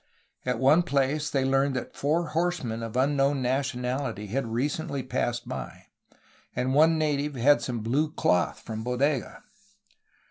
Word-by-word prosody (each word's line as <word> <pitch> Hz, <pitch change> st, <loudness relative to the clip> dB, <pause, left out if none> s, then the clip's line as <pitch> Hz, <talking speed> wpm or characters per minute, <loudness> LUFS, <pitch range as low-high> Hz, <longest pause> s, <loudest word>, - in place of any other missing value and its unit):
At 125 Hz, -2 st, +1 dB
one 140 Hz, +7 st, +5 dB
place 145 Hz, -2 st, 0 dB
they 135 Hz, -2 st, 0 dB
learned 135 Hz, 0 st, +2 dB
that 130 Hz, -, -5 dB
four 160 Hz, +3 st, 0 dB
horsemen 155 Hz, -9 st, -1 dB
of 115 Hz, +1 st, -4 dB
un 140 Hz, +3 st, +2 dB
known 140 Hz, 0 st, +2 dB
nationality 125 Hz, -3 st, -2 dB
had 120 Hz, +5 st, -2 dB
recently 140 Hz, +4 st, -2 dB
passed 120 Hz, -1 st, -2 dB
by, 65 Hz, -3 st, -7 dB, 0.7 s
and 130 Hz, +1 st, 0 dB
one 160 Hz, +3 st, +5 dB
native 150 Hz, -2 st, 0 dB
had 130 Hz, +1 st, +4 dB
some 115 Hz, -1 st, -3 dB
blue 140 Hz, +8 st, 0 dB
cloth 90 Hz, -, +1 dB
from 110 Hz, -1 st, -6 dB
Bodega. 125 Hz, +2 st, -1 dB
135 Hz, 145 wpm, -27 LUFS, 120-145 Hz, 0.7 s, one